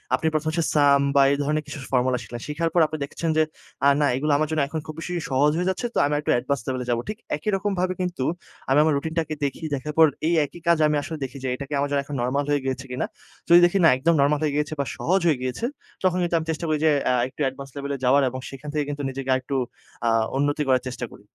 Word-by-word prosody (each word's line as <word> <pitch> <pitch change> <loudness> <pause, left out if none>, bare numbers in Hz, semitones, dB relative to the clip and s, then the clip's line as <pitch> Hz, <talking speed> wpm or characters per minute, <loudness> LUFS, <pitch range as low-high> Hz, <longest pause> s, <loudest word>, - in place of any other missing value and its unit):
আপনি 160 - -1
১ম 155 0 -1
হচ্ছে 165 +1 0
sum 140 -2 +5
বা 140 - +7
এই 140 - +1
ধরনের 150 +1 0
কিছু - - -7
formula 130 -1 +2
শিখলেন। 120 +1 -8
শেখার 160 +3 -1
পর 175 - +4
আপনি 155 - -5
দেখছেন 165 +3 -4
যে, 155 - +5 0.4
"আ - - +7
না, 145 - +4
এগুলো 150 +4 0
আমার 155 +1 +1
জন্য 155 -1 +1
এখন 160 +2 -4
খুব 155 - -7
বেশি 175 +2 -5 0.2
সহজ 140 +2 +3
হয়ে 180 +1 0
যাচ্ছে। 190 +6 -2
তো - - -3
আমি 145 - 0
একটু 150 - -1
advance 130 0 -2
level 130 -1 -2
এ - - -9
যাবো।" 120 0 +1
ঠিক 215 - -4 0.2
একই 150 +8 -3
রকমভাবে 190 -2 -1
কিন্তু 180 -7 -2 0.5
আমি 135 +2 +5
আমার 155 0 +3
রুটিন 160 +3 -4
টাকে 160 -1 -2
দেখি 140 +3 -4
দেখার 140 +3 -5
পর 160 - +9 0.2
এই 170 - +2
একই 170 +4 -12
কাজ 170 -1 +5
আমি 150 - +1
আসলে 160 +2 -6
দেখি 135 0 -6
যে - - -1
এটা 140 - -6
কি - - -5
আমার 140 0 0
জন্য 140 -1 +2 0.2
নরমাল 130 +4 0
হয়ে 145 -1 +2
গিয়েছে 130 0 -3
কিনা? 125 - -1 0.4
যদি 170 +1 +9
দেখি 175 +3 +2
না - - +8
একদম 165 +6 +2
নরমাল 145 +1 +3
হয়ে 150 -2 0
গিয়েছে 150 +1 -1
বা 140 - +1
সহজ 190 +3 +2
হয়ে 155 -5 +3
গিয়েছে। 130 - -2 0.4
তখন 185 -1 +2
কিন্তু 175 -1 0
আমি 160 - -5
চেষ্টা 160 +2 -4
করি 155 - +2
যে 155 - +5 0.2
আ - - +2
একটু 130 - -10
advance 135 +1 -10
level 140 0 -4
এ - - -5
যাওয়ার 135 +3 +5
এবং 130 +1 -6
সেখান 135 +2 -9
থেকে 150 -1 0
কিন্তু 145 0 -4
নিজেকে 135 0 -6
আরেকটু 130 +1 -2 0.5
আ - - +4 0.3
উন্নতি 145 +2 +1
করার 130 -1 +3
চেষ্টা 125 -1 -4
করি। - - -15
145 Hz, 260 wpm, -24 LUFS, 135-160 Hz, 0.5 s, পর